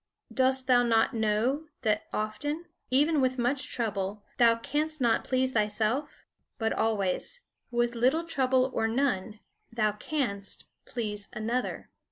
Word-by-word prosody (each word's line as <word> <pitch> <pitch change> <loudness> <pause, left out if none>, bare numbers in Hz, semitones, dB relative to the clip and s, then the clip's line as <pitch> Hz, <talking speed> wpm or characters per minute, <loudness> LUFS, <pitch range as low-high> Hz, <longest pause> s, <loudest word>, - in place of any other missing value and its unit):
Dost 260 0 +4
thou 250 -1 +5
not 235 +2 +3
know 230 +7 0 0.2
that 215 -2 +1
often, 290 +10 -3 0.2
even 290 +3 +3
with 255 0 +1
much 255 +2 0
trouble, 205 -3 -2
thou 230 -1 +6
canst 305 +6 -1
not 235 -3 +2
please 260 0 +1
thyself? 215 +5 0 0.3
But 225 -1 0
always, 220 - 0 0.3
with 240 0 +1
little 255 +8 +2
trouble 260 -5 +1
or 225 - +1
none, 225 -4 -1 0.3
thou 215 -2 +1
canst 210 -4 -3 0.2
please 210 -4 -3
another. 235 +4 -3
240 Hz, 130 wpm, -29 LUFS, 215-265 Hz, 0.3 s, thou